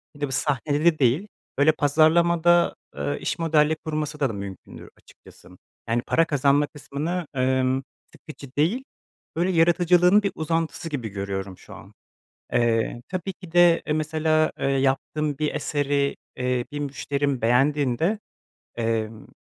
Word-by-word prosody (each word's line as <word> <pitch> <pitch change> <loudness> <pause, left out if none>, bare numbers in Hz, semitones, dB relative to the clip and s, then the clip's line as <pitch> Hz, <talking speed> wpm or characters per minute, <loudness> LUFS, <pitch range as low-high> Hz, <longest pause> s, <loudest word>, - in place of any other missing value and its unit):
Bir 145 - -15
de 145 - 0
bir 135 - -8
sahnede 145 +2 -1
de 170 -2 +4
değil, 140 - +2 0.3
böyle, 145 +3 +5
pazarlamada, 170 +3 +3 0.2
ııı, 70 0 -2
iş - - -3
modelleyip 160 -1 +2
kurması 150 -1 -3
da 140 - +2
mümkündür 100 -4 -8
açıkçası. - - -19 0.4
Yani, 120 +1 +1
para 165 - +3
kazanma 145 0 +2
kısmını, 155 +4 -4
ımm, 130 +1 +1 0.3
sıkıcı 140 -4 -12
değil, 185 - +1 0.5
böyle, 175 +3 +1
yaratıcılığın 175 +3 +4
bir 200 - 0
uzantısı 165 +1 -2
gibi 125 -8 -4
görüyorum 95 -1 -5
şu - - -14
an. - - -14 0.6
Eee, 120 0 +1
tabii 185 +1 -4
ki 180 -2 -14
de, 175 -1 +5
eee, 150 - 0
mesela, 155 0 +1
eee, - - 0
yaptığım 135 +2 0
bir 150 -1 -1
eseri, 145 -1 0 0.2
eee, 125 -1 -1
bir 145 - -4
müşterim 140 -1 -2
beğendiğinde, 140 - +2 0.6
emm, 115 -1 -2
145 Hz, 140 wpm, -24 LUFS, 130-165 Hz, 0.6 s, böyle